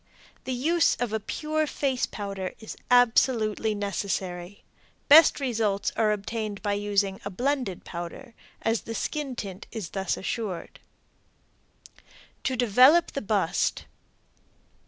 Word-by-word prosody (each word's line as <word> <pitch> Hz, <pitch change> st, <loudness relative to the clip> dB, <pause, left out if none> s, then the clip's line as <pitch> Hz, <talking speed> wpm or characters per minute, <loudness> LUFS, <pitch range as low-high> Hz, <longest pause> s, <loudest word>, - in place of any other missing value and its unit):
The 260 Hz, -, -2 dB
use 320 Hz, +6 st, +2 dB
of 235 Hz, -2 st, -3 dB
a 220 Hz, -, 0 dB
pure 310 Hz, +8 st, -2 dB
face 270 Hz, -3 st, -1 dB
powder 195 Hz, -3 st, -5 dB
is 220 Hz, -, -8 dB
absolutely 225 Hz, -3 st, +3 dB
necessary. 195 Hz, -2 st, -4 dB, 0.4 s
Best 300 Hz, +1 st, +8 dB
results 220 Hz, -7 st, 0 dB
are 215 Hz, -1 st, +2 dB
obtained 210 Hz, 0 st, -4 dB
by 205 Hz, -, 0 dB
using 200 Hz, -1 st, 0 dB
a 200 Hz, -, -4 dB
blended 250 Hz, -2 st, -2 dB
powder, 175 Hz, +9 st, -7 dB, 0.3 s
as 225 Hz, 0 st, +1 dB
the 230 Hz, -, -6 dB
skin 290 Hz, -1 st, -3 dB
tint 195 Hz, -3 st, -7 dB
is 210 Hz, -8 st, -5 dB
thus 195 Hz, -1 st, -2 dB
assured. 195 Hz, -3 st, -4 dB, 1.6 s
TO 260 Hz, -, 0 dB
DEVELOP 255 Hz, +8 st, +5 dB
THE 275 Hz, -, -4 dB
BUST. 205 Hz, -5 st, 0 dB
220 Hz, 120 wpm, -26 LUFS, 200-255 Hz, 1.6 s, Best